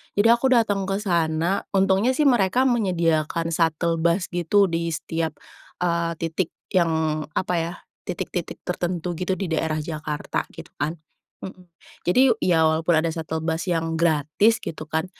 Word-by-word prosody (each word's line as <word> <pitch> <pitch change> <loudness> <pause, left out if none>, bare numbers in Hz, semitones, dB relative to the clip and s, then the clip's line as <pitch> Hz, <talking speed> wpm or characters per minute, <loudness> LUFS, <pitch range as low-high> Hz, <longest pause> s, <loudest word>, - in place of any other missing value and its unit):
Jadi, 205 +2 +4
aku 235 +3 +3
datang 205 -5 +2
kesana 175 -3 0
untungnya 195 +6 +3
sih 300 - +2
mereka 240 -1 +3
menyediakan 170 - +1
shuttle 165 0 +1
bus 170 +3 +1
gitu 175 +3 +3
di 170 0 -1
setiap, 160 0 -3 0.5
eee, 170 -1 0
titik 165 +1 -2 0.2
yang 160 -3 +1
apa 185 - 0
ya? 165 +1 -3 0.3
Titik-titik 175 -1 -4
tertentu 175 -1 -2
gitu 185 +1 -1
di 185 -2 -4
daerah 160 -1 0
Jakarta 155 -2 -4
gitu - - -11
kan. 150 +4 -1 0.5
Heeh. 185 -1 -9 0.4
Jadi, 180 +9 +4 0.2
ya 165 -3 +3
walaupun 160 +1 +2
ada 165 +1 +1
shuttle 160 -1 -4
bus 165 +3 -1
yang 165 -1 0
gratis 165 +7 +3
gitu 155 -1 -6
kan, 160 +2 0
170 Hz, 145 wpm, -23 LUFS, 160-190 Hz, 0.5 s, Jadi